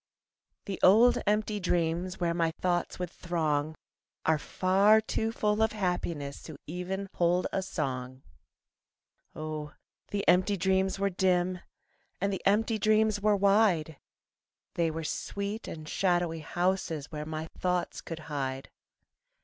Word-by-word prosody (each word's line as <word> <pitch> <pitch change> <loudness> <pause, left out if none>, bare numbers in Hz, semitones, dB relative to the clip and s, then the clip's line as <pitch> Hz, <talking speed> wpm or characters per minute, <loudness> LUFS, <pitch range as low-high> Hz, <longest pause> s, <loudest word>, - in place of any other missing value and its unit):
The 195 - -4
old 225 +6 +6
empty 210 0 +1
dreams 175 0 -1
Where 170 -1 +1
my 165 -1 +1
thoughts 175 -1 0
would 180 -2 -4
throng 155 -3 -1 0.5
Are 160 -1 +3
far 195 +6 +4
too 220 +1 -2
full 210 -1 0
of 220 -1 +2
happiness 175 -8 -2
To 155 -3 -9
even 180 +4 -4
hold 175 +1 +2
a 195 - +1
song. 130 -8 -4 1.1
Oh, 155 -1 -5 0.3
the 200 -1 -3
empty 185 +3 +4
dreams 190 +1 +1
were 200 0 0
dim 180 -1 +1 0.6
And 200 +1 0
the 190 - -3
empty 220 +2 +2
dreams 215 0 +3
were 210 0 +4
wide, 195 -6 +3 0.7
They 170 -1 +1
were 160 +1 -4
sweet 200 +7 -4
and 155 -1 -7
shadowy 175 -2 +1
houses 170 -2 -1
Where 150 -1 -4
my 160 0 -4
thoughts 180 -1 -1
could 165 -1 -7
hide. 135 -3 -4
180 Hz, 135 wpm, -29 LUFS, 160-200 Hz, 1.1 s, old